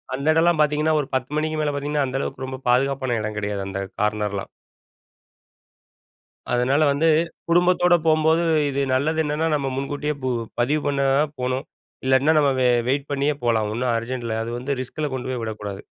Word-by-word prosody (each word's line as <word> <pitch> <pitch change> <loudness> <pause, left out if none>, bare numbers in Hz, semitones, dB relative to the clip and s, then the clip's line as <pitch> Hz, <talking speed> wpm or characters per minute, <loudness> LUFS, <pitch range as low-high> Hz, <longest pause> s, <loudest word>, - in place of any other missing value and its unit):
அந்த 140 +3 -4
எடல்லாம் 165 0 +3
பார்த்தீங்கன்னா, 150 +1 +2
ஒரு 140 - -6
10:00 130 +1 -2
மணிக்கு 155 0 -1
மேலே 150 -1 0
பார்த்தீங்கன்னா 145 0 -1
அந்த 130 +1 -3
அளவுக்கு 135 - -4
ரொம்ப 130 0 -6
பாதுகாப்பான 130 -1 +1
எடம் 105 0 -4
கெடையாது 100 -1 -3
அந்த 100 0 -4 0.2
கார்னர்லாம். 105 -2 -1 2.0
அதனால 125 +5 +2
வந்து 145 +4 +1 0.4
குடும்பத்தோட 175 +1 +4
போம்போது 160 +1 +3 0.3
இது 140 0 -2
நல்லது 155 +5 +1
என்னென்னா, 150 +2 -1
நம்ம 140 -2 -1
முன்கூட்டியே 145 +2 -2
பு 130 - 0 0.3
பதிவு 145 +6 +2
பண்ண 140 -1 0 0.4
போணும். 130 +1 -2 0.4
இல்லாட்டின்னா 130 +4 +3
நம்ம 145 -1 +3
வெ 125 - +4 0.2
வெயிட் 140 +2 0
பண்ணியே 140 +1 +1
போலாம். 110 -3 +2
ஒன்னும் 120 +1 0
அர்ஜென்ட் 120 +1 -4
இல்ல. 110 -1 -2
அது 115 - -5
வந்து 135 +2 -3
ரிஸ்க்ல 150 +4 -4
கொண்டு 130 0 -4
போய் 125 -3 -3
விடக்கூடாது. 105 -3 -6
135 Hz, 165 wpm, -23 LUFS, 120-150 Hz, 2.0 s, குடும்பத்தோட